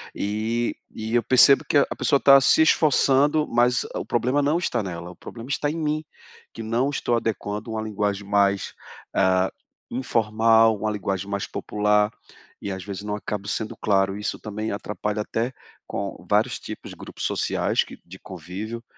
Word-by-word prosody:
E 110 +3 -1
e 110 +1 -6
eu 120 - +4
percebo 130 +2 +6
que 145 - +4
a 140 - +5
a - - -2
pessoa 140 -2 +2
tá 140 -1 +7
se 160 +4 +5
esforçando, 150 0 +3
mas 120 +1 +2
o - - -3
problema 125 +5 +1
não 150 +4 +2
está 125 -9 -1
nela, 85 -2 -6
o - - -14
problema 120 +2 -10
está 145 +1 0
em 160 - -4
mim, 155 0 -1 0.5
que 115 - -8
não 120 +5 0
estou 120 -4 0
adequando 110 -1 -3
uma 110 0 -2
linguagem 105 -2 -2
mais, 100 -1 +1 0.4
ah, 95 -1 +2 0.4
informal, 115 -2 +3
uma 110 +1 -1
linguagem 100 -1 -3
mais 100 -1 -2
popular, 105 0 +1 0.5
e 100 - -4
às 95 - -6
vezes 100 +1 -6
não 105 0 -3
acabo 105 -1 -5
sendo 110 0 -2
claro. 95 -1 +1
Isso 105 - -3
também 110 +1 -5
atrapalha 105 +1 -3
até 115 +4 -2 0.3
com - - -5
vários - - +2
tipos - - -8
de - - -10
grupos - - -8
sociais - - 0
que - - -12
de 95 +2 -11
convívio. 95 +6 -7
110 Hz, 175 wpm, -24 LUFS, 100-125 Hz, 0.5 s, tá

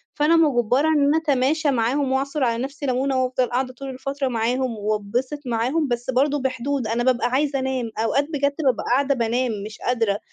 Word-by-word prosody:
فأنا 300 +3 +3
مُجبرة 275 -3 +3
إن 300 -3 +3
أنا 290 +3 +3
أتماشى 295 0 +1
معاهم 260 +3 0
وأعصُر 275 +2 -1
على 235 0 0
نفسي 280 +2 -6
لمونة، 260 0 +1
وأفضل 255 0 0
قاعدة 255 +1 -1
طول 270 +2 -8
الفترة 275 +1 -3
معاهم 245 0 -1
وأتبِسط 215 +7 -2
معاهم، 250 +6 0
بس 240 0 -3
برضه 280 +3 +2
بحدود. 260 -1 -2
أنا 230 +2 0
بابقى 245 -1 +2
عايزة 275 +2 0
أنام، 260 -3 -2
أوقات 250 +6 +1
بجد 280 0 0
بابقى 255 -4 +2
قاعدة 280 +2 +2
بانام 240 +1 0
مش 215 0 -9
قادرة، 225 -5 0
260 Hz, 180 wpm, -22 LUFS, 240-280 Hz, -, فأنا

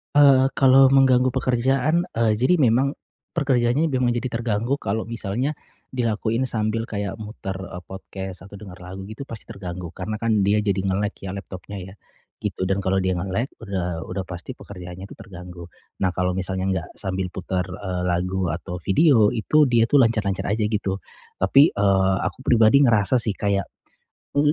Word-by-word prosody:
Eee, 135 -2 +7
Kalau 135 0 +6
mengganggu 130 -2 +5
pekerjaan, 135 +7 +1
eee, 115 -1 +3
jadi 130 +9 +4
memang 135 0 +2 0.4
pekerjaannya 135 +3 +2
memang 125 -2 +1
jadi 120 0 -2
terganggu, 115 +3 -1
kalau 110 +3 -2
misalnya 115 +4 -2 0.4
dilakuin 115 0 0
sambil 115 0 -1
kayak 100 +1 -4
muter, 105 -3 -6
eee, 90 -1 -8
podcast 95 0 -8
atau 100 - -11
dengar 95 -3 -11
lagu 95 +2 -8
gitu 135 +5 -8
pasti 115 - -6
terganggu. 90 -3 -7
Karena 100 +5 -5
kan 110 -1 +1
dia 100 +2 +2
jadi 100 -2 0
nge-lag 100 +2 0
ya 95 0 -6
laptopnya 100 +1 -8
ya, 95 +1 -10 0.5
gitu. - - -3
Dan 95 +1 0
kalau 95 0 0
dia 95 - +1
nge-lag, 95 +7 -1
udah 90 -4 -4
udah 95 +1 -3
pasti 90 -1 -8
pekerjaannya 90 -1 -10
itu 100 - -10
terganggu. 90 -2 -10 0.3
Nah, 95 -1 +1
Kalau 90 0 +1
misalnya 95 0 -2
enggak 95 -3 -2
sambil 95 -1 -3
putar, 90 0 -3
eee, 90 0 -4
lagu 90 +1 0
atau 85 +2 -4
video, 110 - +4
itu 150 +6 +3
dia 120 -2 +4
itu 135 +5 +4
lancar-lancar 110 -5 +1
aja, 110 +1 0
gitu. 105 -2 -1 0.4
Tapi, 135 - +4
eee, 95 -1 +3
aku - - -3
pribadi 120 0 +5
ngerasa 120 -2 +4
sih 110 -3 -1
kayak, 100 -1 0 0.7
m 145 +1 +4
105 Hz, 165 wpm, -23 LUFS, 95-120 Hz, 0.7 s, Eee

